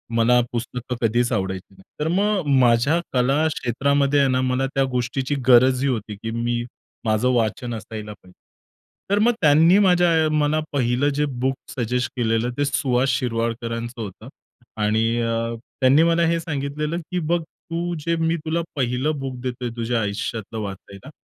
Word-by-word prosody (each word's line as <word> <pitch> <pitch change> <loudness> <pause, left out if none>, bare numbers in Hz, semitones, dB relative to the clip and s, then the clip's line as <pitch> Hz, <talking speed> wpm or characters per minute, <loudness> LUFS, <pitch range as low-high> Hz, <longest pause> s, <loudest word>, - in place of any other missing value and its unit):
मला 120 +2 +4
पुस्तकं 125 +1 -4
कधीच 120 +2 +1
आवडायची 95 -2 -3
नाही. 95 - -18 0.2
तर 150 - 0
मग 195 -2 +1
माझ्या 125 +6 +3
कला 135 +5 +2
क्षेत्रामध्ये 140 +3 +1
आहे 140 -1 +3
ना 130 0 +1
मला 130 +1 0
त्या 135 - +3
गोष्टीची 125 +3 -1
गरजही 130 +2 +5
होती 110 -4 -3
की 110 +3 -6
मी 120 +1 -1 0.4
माझं 110 +3 +2
वाचन 120 +1 -1
असायला 110 -1 -7
पाहिजे. 95 -2 -20 0.8
तर 200 +1 +2
मग 230 +3 +4
त्यांनी 160 +4 +6
माझ्या 180 -3 +4
अ, - - +1
मला 150 0 +2
पहिलं 130 +1 +1
जे 150 +1 +1
बुक 130 +1 -1 0.2
सजेस्ट 125 +1 -1
केलेलं 115 0 0
ते 145 - +1
सुहास 130 -2 +1
शिरवाडकरांचं 115 -1 -2
होतं 105 +2 -8 0.5
आणि 110 +2 +2 0.2
अ, 115 0 -1 0.3
त्यांनी 135 +4 +5
मला 170 0 +3
हे 165 0 +1
सांगितलेलं 150 0 -3
की 180 - 0
"बघ 170 +1 0 0.3
तू 170 +1 -2
जे 170 +3 -1
मी 165 0 +1
तुला 160 +2 0
पहिलं 135 +3 -1
बुक 135 -1 -4
देतोय 125 -1 -4
तुझ्या 115 0 -1
आयुष्यातलं 110 +1 -4
वाचायला. 100 +4 -8
125 Hz, 160 wpm, -22 LUFS, 115-150 Hz, 0.8 s, त्यांनी